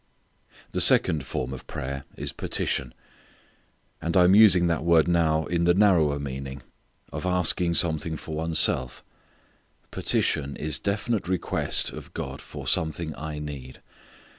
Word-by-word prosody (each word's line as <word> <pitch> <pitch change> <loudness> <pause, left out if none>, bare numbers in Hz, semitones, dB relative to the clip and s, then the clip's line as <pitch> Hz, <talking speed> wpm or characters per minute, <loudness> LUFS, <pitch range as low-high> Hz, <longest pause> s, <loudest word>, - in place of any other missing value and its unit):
_ - - -32
The - - -1
second 75 -5 +4
form 65 0 -4
of 65 - -10
prayer 70 +1 -6
is - - -4
petition. 65 -2 -2 1.1
And 85 +2 -1
I 90 - +6
am 90 +2 +5
using 100 -4 +6
that 85 -3 0
word 85 -1 +4
now 80 -2 +1
in 85 0 -1
the 85 0 +4
narrower 85 -8 +3
meaning 70 -1 -6 0.5
of 75 - -5
asking 90 -1 +1
something 80 -1 +1
for 80 - -8
one's 80 +1 -1
self. 65 -2 +3 0.9
Petition 70 -1 -1
is 75 -2 -3
definite 100 0 -2
request 95 -1 -1
of - - -11
God - - -6
for - - -10
something 80 0 -1
I 75 +1 -6
need. 70 -3 -8
80 Hz, 145 wpm, -25 LUFS, 70-85 Hz, 1.1 s, I